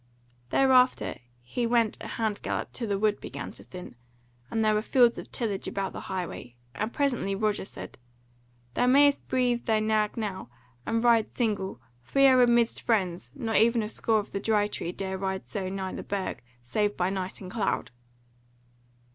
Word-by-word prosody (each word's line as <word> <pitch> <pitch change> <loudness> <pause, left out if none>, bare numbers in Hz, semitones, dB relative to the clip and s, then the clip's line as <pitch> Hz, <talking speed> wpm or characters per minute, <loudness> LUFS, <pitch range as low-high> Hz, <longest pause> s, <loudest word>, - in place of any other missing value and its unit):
Thereafter 260 -1 +3 0.2
he 235 - -2
went 230 -2 +2
a - - -6
hand 220 -3 -1
gallop - - -3
till 235 - -3
the 200 -1 0
wood 210 0 +1
began - - -6
to - - -14
thin, 180 -1 -9 0.6
and 225 -1 0
there 215 - +4
were 210 - +2
fields 240 +1 +4
of - - -10
tillage 210 -5 -2
about 195 -1 -3
the - - -5
highway; 180 -10 -5 0.2
and 215 +2 -2
presently 245 -9 0
Roger 210 -1 0
said: 195 - -9 0.7
"Thou 245 - +2
mayst 285 +2 +5
breathe 245 -2 +1
thy 220 -1 +3
nag 215 0 +1
now, 200 - -4 0.4
and 230 +1 +1
ride 230 -2 +3
single, 205 -5 -1 0.2
for 125 - -7
we 275 - +7
are 260 -1 +7
amidst 240 -1 +3
friends; 180 - 0
not 225 -2 0
even 230 +1 +4
a - - -3
score 225 0 +1
of 205 - -3
the 200 - -2
Dry 210 0 +2
Tree 175 - -4
dare 190 0 -4
ride 190 0 -2
so 190 -3 -4
nigh 190 -1 -4
the - - -5
Burg 195 -2 -3 0.2
save 205 - 0
by 180 +1 +1
night 190 -1 -4
and 185 -2 -8
cloud." 215 - -1
215 Hz, 180 wpm, -28 LUFS, 195-235 Hz, 0.7 s, we